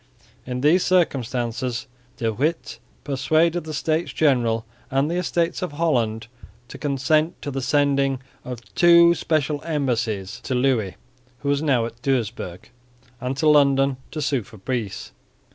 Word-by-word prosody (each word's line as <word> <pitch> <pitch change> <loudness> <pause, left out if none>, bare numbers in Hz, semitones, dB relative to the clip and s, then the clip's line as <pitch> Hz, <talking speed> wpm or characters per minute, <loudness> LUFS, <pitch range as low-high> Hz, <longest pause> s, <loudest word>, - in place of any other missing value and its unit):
In 125 0 -3
these 160 +6 +4
circumstances 125 -8 0 0.3
De 115 -1 -1
Witt 155 +9 -2 0.2
persuaded 155 +5 +1
the 155 - -6
States 160 +3 -1
General 120 -7 +2 0.2
and 135 +4 +1
the 175 - -1
Estates 170 -1 0
of 180 -5 -3
Holland 120 -9 0 0.4
to - - -9
consent 155 +4 +1
to 145 - -3
the 135 0 -3
sending 140 -1 +2 0.2
of 125 -2 -6
two 170 0 +7
special 155 -3 -1
embassies 120 - -2
to 130 - -3
Louis, 125 -7 +1 0.5
who 140 - -2
was 145 0 +1
now 135 -7 +2
at 115 +1 -9
Doesburg, 120 -7 -2 0.5
and 130 +1 -3
to 155 +2 +1
London, 140 -2 +4
to 155 -1 -4
sue 135 -3 +1
for 110 +1 -14
peace. 110 -1 -4
135 Hz, 145 wpm, -23 LUFS, 120-155 Hz, 0.5 s, two